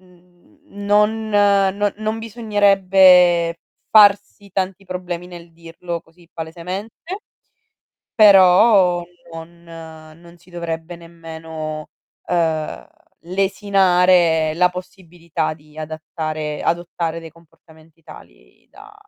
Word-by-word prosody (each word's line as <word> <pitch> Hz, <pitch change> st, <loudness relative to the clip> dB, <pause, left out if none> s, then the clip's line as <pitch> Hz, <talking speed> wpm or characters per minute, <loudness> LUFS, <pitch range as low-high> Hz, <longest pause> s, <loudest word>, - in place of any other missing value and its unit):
mhmm 180 Hz, -1 st, -26 dB, 0.2 s
n 205 Hz, 0 st, -9 dB, 0.5 s
non 200 Hz, -1 st, +2 dB
non 215 Hz, +1 st, -3 dB
bisognerebbe 190 Hz, -6 st, +3 dB, 0.3 s
farsi 205 Hz, -1 st, +4 dB
tanti 190 Hz, 0 st, -3 dB
problemi 180 Hz, -1 st, -6 dB
nel 175 Hz, -1 st, -12 dB
dirlo 170 Hz, +1 st, -8 dB
così 165 Hz, +1 st, -24 dB
palesemente, 185 Hz, -, -7 dB, 0.9 s
però 190 Hz, -3 st, +5 dB, 0.3 s
non 165 Hz, +1 st, -11 dB
non 165 Hz, 0 st, -13 dB
si 180 Hz, +2 st, -23 dB
dovrebbe 170 Hz, 0 st, -6 dB
nemmeno, 160 Hz, -2 st, -9 dB, 0.4 s
uhm, 160 Hz, -, -2 dB, 0.3 s
lesinare 180 Hz, -3 st, +2 dB
la 180 Hz, +2 st, +3 dB
possibilità 175 Hz, -3 st, -6 dB
di 150 Hz, 0 st, -19 dB
adattare 155 Hz, -1 st, -5 dB
adottare 170 Hz, -1 st, -3 dB
dei 165 Hz, -1 st, -11 dB
comportamenti 160 Hz, 0 st, -23 dB
tali -, -, -17 dB
da, 420 Hz, 0 st, -16 dB
175 Hz, 90 wpm, -19 LUFS, 165-190 Hz, 0.9 s, però